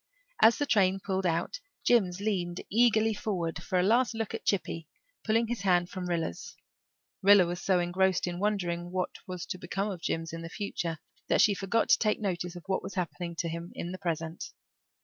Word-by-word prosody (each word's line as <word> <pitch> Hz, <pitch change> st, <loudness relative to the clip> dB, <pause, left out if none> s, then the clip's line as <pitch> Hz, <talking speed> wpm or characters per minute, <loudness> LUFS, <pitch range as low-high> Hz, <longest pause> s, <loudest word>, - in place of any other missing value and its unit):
As 230 Hz, -, +7 dB
the 290 Hz, -, 0 dB
train 195 Hz, -6 st, +3 dB
pulled 190 Hz, -1 st, -1 dB
out 170 Hz, -, -1 dB, 0.2 s
Jims 195 Hz, -7 st, +3 dB
leaned 185 Hz, -4 st, -1 dB
eagerly 225 Hz, 0 st, +4 dB
forward 175 Hz, -6 st, -3 dB
for 180 Hz, +1 st, 0 dB
a -, -, +3 dB
last 235 Hz, +3 st, +3 dB
look 225 Hz, -2 st, -3 dB
at -, -, -5 dB
Chippy, 165 Hz, -5 st, -1 dB, 0.4 s
pulling 225 Hz, +1 st, +2 dB
his 235 Hz, -3 st, -3 dB
hand 175 Hz, -2 st, +2 dB
from 185 Hz, -2 st, -4 dB
Rilla's. 165 Hz, -, -3 dB, 0.7 s
Rilla 200 Hz, -1 st, +7 dB
was 175 Hz, +1 st, -4 dB
so 190 Hz, -2 st, +2 dB
engrossed 180 Hz, +1 st, +1 dB
in 175 Hz, -1 st, -4 dB
wondering 175 Hz, -4 st, -1 dB
what 185 Hz, 0 st, -1 dB, 0.2 s
was 180 Hz, -2 st, -5 dB
to 185 Hz, -, -5 dB
become 195 Hz, +4 st, -2 dB
of 180 Hz, -4 st, -7 dB
Jims 165 Hz, -1 st, -2 dB
in 165 Hz, -, -5 dB
the 165 Hz, -, -6 dB
future 175 Hz, -4 st, -3 dB, 0.3 s
that -, -, +2 dB
she 210 Hz, -, +6 dB
forgot 200 Hz, +4 st, 0 dB
to -, -, +6 dB
take 215 Hz, -1 st, +1 dB
notice 180 Hz, -4 st, -2 dB
of 175 Hz, -, -9 dB
what 190 Hz, -1 st, 0 dB
was -, -, -7 dB
happening 175 Hz, -1 st, -3 dB
to 170 Hz, +1 st, -2 dB
him 170 Hz, +1 st, -5 dB
in 175 Hz, -, -4 dB
the 185 Hz, -, -6 dB
present. 165 Hz, -1 st, -3 dB
185 Hz, 200 wpm, -29 LUFS, 175-205 Hz, 0.7 s, As